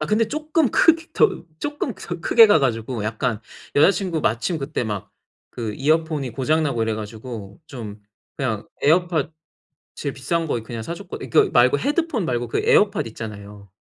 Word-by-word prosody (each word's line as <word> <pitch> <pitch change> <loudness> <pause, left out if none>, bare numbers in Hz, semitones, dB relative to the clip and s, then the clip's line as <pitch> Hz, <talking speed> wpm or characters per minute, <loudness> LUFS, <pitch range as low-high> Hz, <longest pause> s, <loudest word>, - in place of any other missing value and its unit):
아 155 - -2
근데 220 +1 +2
쪼끔 305 -1 +1
크게 330 0 +4
더 450 - +2 0.2
쪼끔 295 -5 -3
더 175 -1 -7
크게 225 +5 +7
가 180 - +6
가지고 115 -4 -1
약간 115 +1 -2 0.4
여자 155 +7 +7
친구 185 -6 -2
마침 120 +10 0
그때 135 -2 -3
막 105 -3 -5 0.4
그 110 -3 -4
이어폰이 155 -2 0
고장 155 +6 +1
나고 120 -6 0
이래 110 -1 0
가지고 110 - -8
좀 110 -7 -8 0.4
그냥 115 -6 -2 0.2
에어팟 165 -1 +2 0.7
제일 140 -2 -4
비싼 165 +6 -1
거 120 - 0
이 - - -11
그냥 115 -1 -6
사줬거 175 - -6
이 130 - -7
그 - - +4
말고 125 +3 +5
헤드폰 290 - 0
말고 120 -3 -2
그 - - 0
에어팟 205 0 +3
있잖아요. 105 -3 -9
135 Hz, 330 characters per minute, -22 LUFS, 115-175 Hz, 0.7 s, 크게